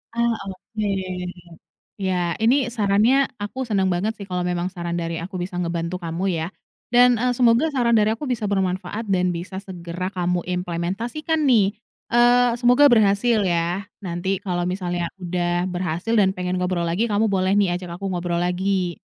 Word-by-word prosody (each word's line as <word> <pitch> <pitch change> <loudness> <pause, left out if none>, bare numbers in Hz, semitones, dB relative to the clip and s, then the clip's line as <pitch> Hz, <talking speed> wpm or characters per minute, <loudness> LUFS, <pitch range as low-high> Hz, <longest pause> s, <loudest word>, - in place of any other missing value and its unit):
Ah 235 0 +2 0.2
oke. 210 +3 -5 1.1
Ya, 180 -4 -1
ini 245 +4 +2
sarannya, 225 +4 +3 0.2
aku 260 +6 -4
senang 195 -5 +1
banget 185 +5 0
sih 200 -3 -10
kalau 180 -1 -1
memang 175 0 -1
saran 175 -2 -5
dari 170 -1 -2
aku 180 +2 -5
bisa 180 0 -5
ngebantu 170 0 -2
kamu 175 +2 -2
ya. 165 -3 -1 0.5
Dan, 245 0 +6
eee, 250 +2 +1
semoga 240 +4 +4
saran 235 -3 +3
dari 215 0 +3
aku 260 +5 -5
bisa 235 -4 -1
bermanfaat 195 +2 -2
dan 180 -2 +2
bisa 175 +3 -6
segera 185 -1 -6
kamu 180 -1 -1
implementasikan 190 - -2
nih. 205 -5 +4 0.4
Eee, 245 +1 +5
semoga 245 +4 +5
berhasil 220 -1 +3
ya. 175 +2 -1
Nanti 185 0 -2
kalau 180 -3 -2
misalnya 175 -2 -2
udah 175 0 -1
berhasil 180 +3 -2
dan 195 -3 +4
pengen 180 0 -2
ngobrol 180 -1 0
lagi, 185 +8 0
kamu 210 +1 +2
boleh 190 0 +1
nih 195 -4 +3
ajak 175 -1 -6
aku 195 - -6
ngobrol 175 -1 -1
lagi. 180 0 -1
190 Hz, 165 wpm, -22 LUFS, 175-225 Hz, 1.1 s, Dan